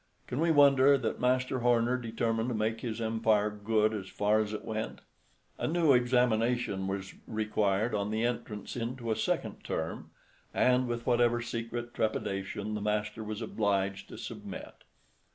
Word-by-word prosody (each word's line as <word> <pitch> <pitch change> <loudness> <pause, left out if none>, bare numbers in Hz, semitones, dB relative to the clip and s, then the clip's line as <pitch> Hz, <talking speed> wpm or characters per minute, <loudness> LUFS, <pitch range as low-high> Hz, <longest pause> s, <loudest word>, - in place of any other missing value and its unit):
Can 125 - -4
we 165 +1 +2
wonder 140 -2 +6
that 120 -4 -2
Master 130 +1 +1
Horner 120 0 +3
determined 115 -1 -1
to 120 - -1
make 110 +1 -1
his 115 -2 -4
empire 110 -2 +2
good 110 +1 +1
as 100 -3 -4
far 105 +1 +2
as 105 -1 -1
it 110 - -5
went? 110 0 -4 0.6
A - - 0
new 160 -3 +4
examination 120 -4 +2
was 95 0 -4
required 110 0 0
on 100 -1 0
the 110 +2 0
entrance 110 -3 -4
into 120 0 -3
a - - +2
second - - -2
term, 80 0 -4 0.5
and, 125 0 +3
with 120 0 -3
whatever 120 -1 +3
secret 120 0 -4
trepidation, 105 -1 -2
the 105 - -3
master 105 +1 -1
was 110 +1 -4
obliged 100 -3 -1
to - - -9
submit. - - -7
115 Hz, 155 wpm, -30 LUFS, 105-120 Hz, 0.6 s, wonder